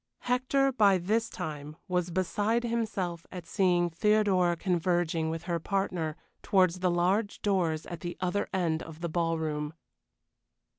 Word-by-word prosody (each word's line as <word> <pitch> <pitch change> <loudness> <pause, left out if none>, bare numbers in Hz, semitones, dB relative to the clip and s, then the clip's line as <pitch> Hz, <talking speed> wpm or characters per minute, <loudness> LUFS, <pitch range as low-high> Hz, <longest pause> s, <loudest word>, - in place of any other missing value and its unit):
Hector 260 +2 +2
by 205 -6 +4
this 215 +6 0
time 150 0 -6
was 180 -2 0
beside 205 +6 0
himself 205 -8 -2
at 180 -3 -7
seeing 175 -2 +2
Theodora 190 -1 +3
converging 175 -2 0
with 165 0 -4
her 175 -1 -1
partner 175 -4 -1 0.3
towards 185 -2 +3
the 180 0 +2
large 185 +5 +1
doors 170 -6 +1
at 175 - -7
the 175 +2 -5
other 185 +2 -1
end 170 -4 0
of 160 0 -10
the 170 - -2
ballroom. 160 -2 -1
180 Hz, 140 wpm, -29 LUFS, 165-200 Hz, 0.3 s, by